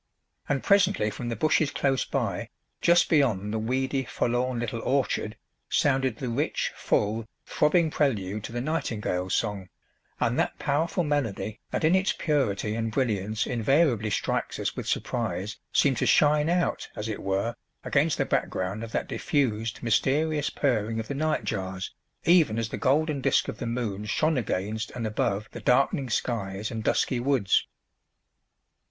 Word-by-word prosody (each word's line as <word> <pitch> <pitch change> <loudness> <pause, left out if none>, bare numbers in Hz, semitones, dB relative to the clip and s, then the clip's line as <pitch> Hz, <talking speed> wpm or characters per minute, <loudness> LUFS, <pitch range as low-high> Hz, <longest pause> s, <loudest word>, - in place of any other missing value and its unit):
And 140 -2 0
presently 195 - +3
from 120 +1 -5
the 115 - -2
bushes 155 +4 +2
close 135 -2 0
by, - - -2 0.3
just 175 0 +5
beyond 110 - +2
the 110 - 0
weedy, 130 +4 0
forlorn 125 0 -1
little 115 0 -3
"orchard," 125 -5 0 0.3
sounded 130 -4 +2
the 130 - -4
rich, 130 +6 -1
full, 110 +2 0 0.2
throbbing 155 +1 +2
prelude 105 -9 0
to - - -7
the 120 +1 -3
nightingale's 105 - -1
song, 100 -4 -2 0.5
and - - +1
that - - 0
powerful 160 +5 0
melody 115 -8 -2
that - - -2
in 160 +3 +4
its 190 +1 +3
purity 115 -9 0
and 115 0 -2
brilliance 110 -3 0
invariably 120 -1 +2
strikes 105 - -1
us - - -2
with - - -5
surprise 105 +3 -2
seemed 135 -4 +3
to - - +1
shine 150 +1 +4
out, 175 0 0
as 105 - -4
it 110 - -4
were, 100 +4 -1 0.3
against - - +2
the - - +1
background 95 +4 -1
of 115 - -7
that - - -1
diffused, 115 -5 -1
mysterious 145 +6 +1
purring 115 -5 0
of 110 - -5
the - - -1
nightjars, 100 -11 -2 0.3
even 165 -11 +5
as 115 -1 -1
the - - -4
golden 150 +1 +1
disc - - +2
of - - -5
the 120 - -3
moon 115 -4 -2
shone 155 +9 +1
against 110 +1 -2
and 120 -2 -3
above 105 -1 -1
the - - -8
darkening 135 +1 +2
skies 105 -3 -2
and 110 -2 -4
dusky 125 +3 +1
woods. 125 -6 +2
120 Hz, 155 wpm, -27 LUFS, 105-145 Hz, 0.5 s, just